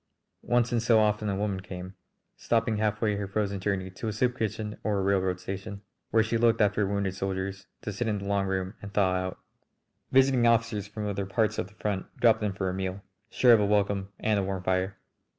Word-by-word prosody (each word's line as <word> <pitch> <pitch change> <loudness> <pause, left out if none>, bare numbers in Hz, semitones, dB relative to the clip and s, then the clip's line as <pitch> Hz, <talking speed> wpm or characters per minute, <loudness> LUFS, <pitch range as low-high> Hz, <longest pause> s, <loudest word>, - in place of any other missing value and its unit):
Once 120 0 +1
in 120 - +3
so 115 0 +4
often 105 0 +1
a 100 - 0
woman 100 -1 -1
came, 90 0 -8 0.4
stopping 115 -1 0
halfway 105 0 +1
her 100 -1 -3
frozen 100 0 -1
journey 95 -1 -2
to 95 +5 -6
a - - 0
soup 125 +4 0
kitchen 110 -2 -3
or 105 -2 0
a 95 - 0
railroad 95 -2 +1
station, 100 +2 -6 0.3
where 110 0 +4
she 115 +1 0
looked 115 -1 +4
after 105 -1 +2
wounded 100 -1 -1
soldiers, 95 +1 -4 0.2
to 105 - -4
sit 115 +3 -2
in 105 -2 0
the 100 - -6
long 100 -1 0
room 95 0 -2
and 100 0 -9
thaw 95 -3 +3
out; 95 0 -2 0.7
visiting 130 -2 +5
officers 115 -3 +2
from 105 +1 -5
other 100 -1 -2
parts 105 +2 0
of - - -2
the 100 - -20
front 100 -3 -2
dropped 115 -2 +4
in 105 -1 0
for 95 0 -3
a 90 - -1
meal, 95 +1 -4 0.3
sure 125 0 +5
of 115 - +6
a 105 - +2
welcome 100 -1 +1
and 105 -2 +1
a - - 0
warm 95 -1 -3
fire. 95 +1 0
100 Hz, 220 wpm, -28 LUFS, 95-110 Hz, 0.7 s, of